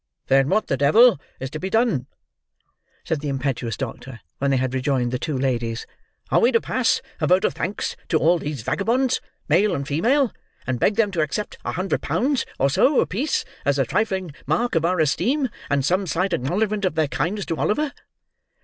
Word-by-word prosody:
"Then 135 +1 +4
what 215 +2 +2
the 135 - -1
devil 185 - +5 0.2
is 130 0 -5
to 155 - -5
be 190 - -3
done?" 220 - +1 1.0
said 160 - -1
the 150 - -3
impetuous 130 -4 -2
doctor, 130 -1 -6 0.2
when 140 - +1
they 135 - +3
had 130 0 -1
rejoined 130 -2 0
the 125 - -2
two 150 -4 -2
ladies. 120 -3 -1 0.5
"Are - - +5
we 240 - +4
to 230 - +5
pass 255 0 0 0.2
a - - +1
vote 185 +1 +4
of - - +1
thanks 195 +4 -3
to 160 - +3
all 170 +2 +3
these 145 -7 -5
vagabonds, 230 - +1 0.3
male 190 +7 +3
and 140 -1 -4
female, 240 - +2 0.3
and 130 -2 -2
beg 205 - +2
them 215 -2 +2
to 170 -4 0
accept 155 +8 -3
a - - -3
hundred 190 +1 -1
pounds, 275 0 0
or 135 0 +2
so, 275 - +4
apiece, 260 +11 0 0.2
as 140 0 +1
a 135 - +2
trifling 190 - -1 0.2
mark 165 - +1
of 165 0 +2
our 180 +1 +1
esteem, 250 - +1 0.2
and 140 -2 +1
some 185 +4 +1
slight 180 +3 0
acknowledgment 205 - 0
of 185 -4 0
their 155 -1 +2
kindness 180 +9 -2
to 165 - -3
Oliver?" 290 +7 0
165 Hz, 195 wpm, -23 LUFS, 135-210 Hz, 1.0 s, devil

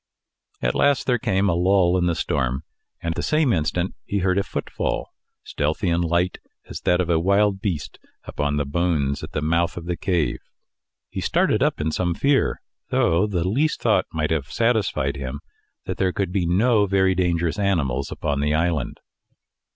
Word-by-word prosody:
At - - +2
last 145 -2 +2
there 125 -2 +2
came 100 -3 +1
a 90 - +2
lull 90 0 +3
in 90 -1 +2
the 85 - +1
storm, 65 -2 -1 0.4
and 85 0 -1
the - - -3
same 150 -5 +2
instant 85 +3 -1
he 100 - -2
heard 95 0 +2
a - - +3
footfall, - - -3 0.3
stealthy 80 +5 -1
and 85 +1 +1
light 85 +2 0 0.3
as - - -8
that 90 - +2
of 90 - +1
a 85 -2 +2
wild 100 +2 +2
beast, 90 -9 -3 0.2
upon 75 0 -2
the 75 - 0
bones 70 -2 0
at - - -8
the 75 - -2
mouth 85 +3 +1
of 85 - -6
the 90 0 -2
cave. 90 -4 0 0.7
He - - -4
started - - +2
up - - +1
in 80 +1 -1
some 90 +1 -1
fear, 140 +5 +1 0.3
though 85 +6 +2
the 90 -4 -1
least 145 +10 +1
thought - - +2
might 80 -1 -1
have 75 -4 0
satisfied 100 - +1
him 65 -2 -5 0.5
that - - -4
there 95 -1 +1
could 95 -1 -2
be 90 -3 0
no 105 +4 +3
very 95 -1 +3
dangerous 85 0 0
animals 70 -10 0
upon 70 -2 -2
the 75 +1 +1
island. 80 -5 -1
85 Hz, 180 wpm, -23 LUFS, 80-100 Hz, 0.7 s, lull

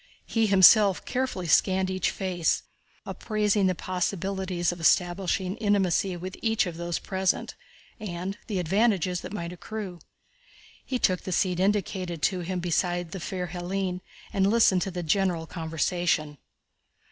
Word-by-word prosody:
He 225 -1 +1
himself 195 0 +6
carefully 250 -8 -2
scanned 185 +3 +3
each 185 -1 0
face, 180 -4 -1 0.4
appraising 210 -2 0
the 185 - +1
possibilities 185 0 -2
of 175 - -8
establishing 180 +3 +1
intimacy 195 -4 +1
with 185 +2 -7
each 225 -2 +2
of 175 -2 -5
those 170 0 -3
present, 190 -1 -1 0.5
and 190 -2 -4
the 210 -5 -2
advantages 185 0 +1
that - - -8
might 170 -4 -5
accrue. 185 0 -7 0.8
He 260 - -2
took 185 -6 +1
the 185 - -6
seat 180 0 +1
indicated 185 -4 -1
to 185 -3 +2
him 180 +1 -3
beside 175 0 -1
the 190 - -5
fair 180 +1 -4
Hélène 180 +1 -3 0.3
and 195 -1 +2
listened 210 -5 +4
to 195 - -1
the 175 -1 -5
general 175 0 +1
conversation. 160 -2 -1
185 Hz, 140 wpm, -27 LUFS, 175-195 Hz, 0.8 s, himself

